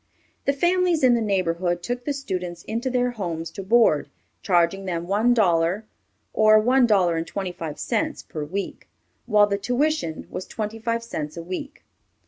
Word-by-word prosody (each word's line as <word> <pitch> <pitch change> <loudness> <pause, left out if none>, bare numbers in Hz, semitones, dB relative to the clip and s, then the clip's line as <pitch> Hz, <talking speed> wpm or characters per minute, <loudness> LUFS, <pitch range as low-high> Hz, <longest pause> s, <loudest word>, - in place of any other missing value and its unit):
The 280 - +3
families 345 +1 +2
in 250 -1 +6
the 235 - +2
neighborhood 175 -4 0
took 245 +4 -4
the 290 - 0
students 180 -10 -5
into 235 +4 -2
their 250 -1 +1
homes 170 -7 -4
to 195 - -7
board, 200 -6 +3 0.3
charging 180 0 +2
them 170 -2 -3
one 210 +6 +2
dollar 180 0 +2 0.5
or 215 0 +6
one 250 +3 +4
dollar 185 -6 +3
and 165 0 -3
twenty 190 -2 -4
five 165 -4 -6
cents 305 +6 -2
per 155 - -6
week, 190 +7 -5 0.4
while 210 -2 +5
the 200 -1 -2
tuition 250 - -1
was 185 - -5
twenty 220 0 -5
five 230 +1 -1
cents 155 -9 -5
a 170 - -5
week. 185 +11 -6
205 Hz, 170 wpm, -24 LUFS, 175-245 Hz, 0.5 s, in